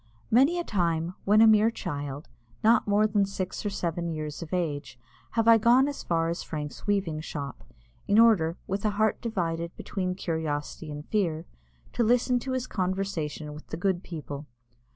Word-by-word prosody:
Many 275 +9 +5
a 345 - -1
time, 170 - 0
when 210 +2 +5
a 225 - +8
mere 220 0 +6
child, 145 -9 -5 0.4
not 225 0 +4
more 205 +1 +4
than 210 -1 +2
six 195 -1 -4
or 205 - -1
seven 170 -3 -2
years 155 -2 -5
of 165 - -7
age, 145 -8 -2 0.4
have 225 -1 +1
I 230 -1 +8
gone 245 +5 +5
as 285 - -4
far 165 -1 0
as 170 - -3
Frank's 150 +2 -6
weaving 185 -7 0
shop, 140 -4 -6 0.4
in 205 - +3
order, 200 -8 +5
with 195 +1 -3
a 215 - +2
heart 215 0 +2
divided 170 -6 -2
between 185 -2 -3
curiosity 160 -3 -3
and 150 0 -7
fear, 170 -7 0 0.5
to 240 - +1
listen 245 +2 +3
to 260 +2 -4
his 255 -1 -1
conversation 180 -7 -3
with 150 - -11
the - - -5
good 180 0 0
people. 150 -4 -7
180 Hz, 175 wpm, -27 LUFS, 160-215 Hz, 0.5 s, a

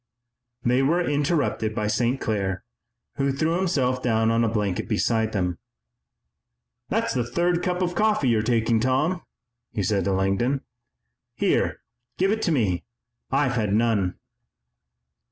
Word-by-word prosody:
They 125 +2 +3
were 170 +6 +2
interrupted 145 -7 0
by 105 -2 -1
St. 120 +4 +1
Clair, 95 -4 -2 0.5
who 140 0 +1
threw 155 +5 0
himself 135 -9 0
down 110 -2 +2
on 115 +1 +2
a 115 - +2
blanket 105 -4 -1
beside 110 -1 +1
them. 90 -4 -1 1.3
"That's 230 +2 0
the 125 - 0
third 170 +9 0
cup 180 -1 -1
of 175 0 -1
coffee 210 -6 +2
you're 110 -2 +3
taking, 115 0 +2
Tom," 135 +9 +1 0.5
he 100 - -2
said 95 -1 +1
to 100 - +1
Langdon. 95 +8 +1 0.7
"Here, - - +1 0.4
give 190 +2 +2
it 220 +1 0
to 175 - +1
me. 105 - +1 0.5
I've 135 -1 +2
had 105 -5 0
none." 110 -5 +1
120 Hz, 140 wpm, -24 LUFS, 110-155 Hz, 1.3 s, They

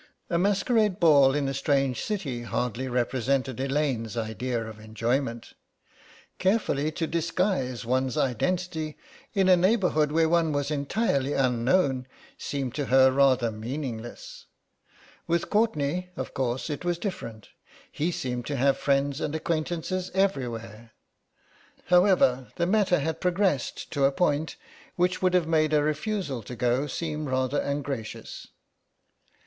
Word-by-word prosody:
A 170 - +2
masquerade 205 +1 +2
ball 140 -5 +6
in 145 -2 0
a 135 - -2
strange 135 -2 +1
city 150 - -3
hardly 125 +1 -2
represented 130 +1 -1
Elaine's 135 -5 -1
idea 115 +1 -2
of 110 -1 -10
enjoyment. 115 +3 -2 0.9
Carefully 185 -7 +1
to 165 - -1
disguise 165 - -1
one's 130 +1 0
identity 160 +4 -1 0.4
in 195 -2 +3
a 185 - +7
neighbourhood 180 -5 +2
where 160 +1 +3
one 165 -2 +2
was 145 +1 -1
entirely 140 - 0
unknown 130 +1 +1 0.3
seemed 135 -4 -4
to 145 - -2
her 130 0 +5
rather 130 -3 +3
meaningless. 120 +1 -6 0.8
With 170 0 0
Courtenay, 180 -5 +1
of 130 - -5
course, 130 +3 -2
it 145 - -5
was 175 -1 0
different; 115 - -6 0.4
he 165 +4 -1
seemed 125 -6 -4
to 145 - -2
have 135 +1 +2
friends 140 +1 +1
and 150 - -2
acquaintances 170 +3 -2
everywhere. 115 - -2 0.9
However, 180 -8 +4
the 170 - 0
matter 190 -1 +3
had 160 +2 -3
progressed 180 -6 0
to 140 -2 +2
a 135 - +4
point 150 +1 0 0.4
which 180 +1 +1
would 185 -1 +2
have 180 -2 +3
made 155 -1 +2
a 150 -1 +4
refusal 155 - -2
to 125 +4 -8
go 125 +4 +1
seem 155 +1 -3
rather 130 +2 0
ungracious. 140 -5 -4
145 Hz, 130 wpm, -27 LUFS, 130-170 Hz, 0.9 s, a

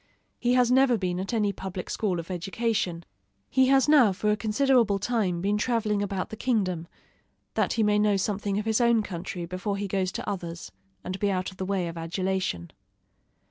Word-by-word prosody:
He 245 0 +2
has 250 -1 +4
never 260 -2 +4
been 180 -3 -2
at 190 - -3
any 210 -4 +1
public 190 -1 -6
school 190 -5 -1
of 170 +3 -7
education. 185 -1 -2 0.5
He 260 0 +4
has 270 0 +4
now 285 -9 +6
for 210 +3 0
a - - +3
considerable 225 0 +2
time 195 -5 -1
been 205 +2 +1
traveling 215 -3 0
about 195 -2 -3
the - - -4
kingdom, 190 -9 -1 0.7
that - - +1
he 225 - +1
may 210 0 +3
know 210 -1 +3
something 200 0 -1
of 210 - -2
his 220 +2 +2
own 235 -2 +4
country 175 -1 -5
before 185 +3 -3
he 200 0 -3
goes 190 -1 -1
to - - -5
others, 170 - -5 0.3
and 185 +1 -5
be 205 - +1
out 185 -1 -1
of 185 - -16
the 190 - -3
way 190 -2 -1
of 165 0 -6
adulation. 180 - -2
200 Hz, 195 wpm, -27 LUFS, 185-225 Hz, 0.7 s, now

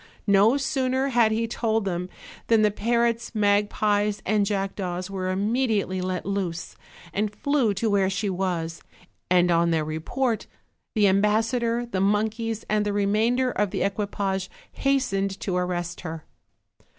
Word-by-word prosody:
No 205 +5 +5
sooner 265 -1 0
had 235 -3 +3
he 225 +1 0
told 225 -2 -1
them 180 -1 -2 0.4
than 225 -2 +4
the 210 - +4
parrots, 235 +2 0
magpies 205 0 +2
and 205 -1 +2
jackdaws 195 -2 -3
were 185 -1 -2
immediately 205 -1 0
let 185 0 -3
loose, 185 -4 -3 0.4
and 210 +2 0
flew 275 -2 +1
to 225 +4 -1
where 200 -2 +2
she 200 +2 -2
was; 175 -4 -2 0.5
and 180 -1 +4
on 170 0 +3
their 160 -2 +1
report 215 +10 -2 0.5
the 210 -2 +4
ambassador, 225 +4 +1
the 195 -6 -2
monkeys 220 +2 0
and 210 0 +1
the 205 -1 -1
remainder 220 +6 +2
of 210 -3 0
the - - -1
equipage 195 -1 -2 0.2
hastened 195 -8 0
to 185 - -2
arrest 175 -1 -2
her. 160 -2 -6
205 Hz, 140 wpm, -25 LUFS, 190-225 Hz, 0.5 s, No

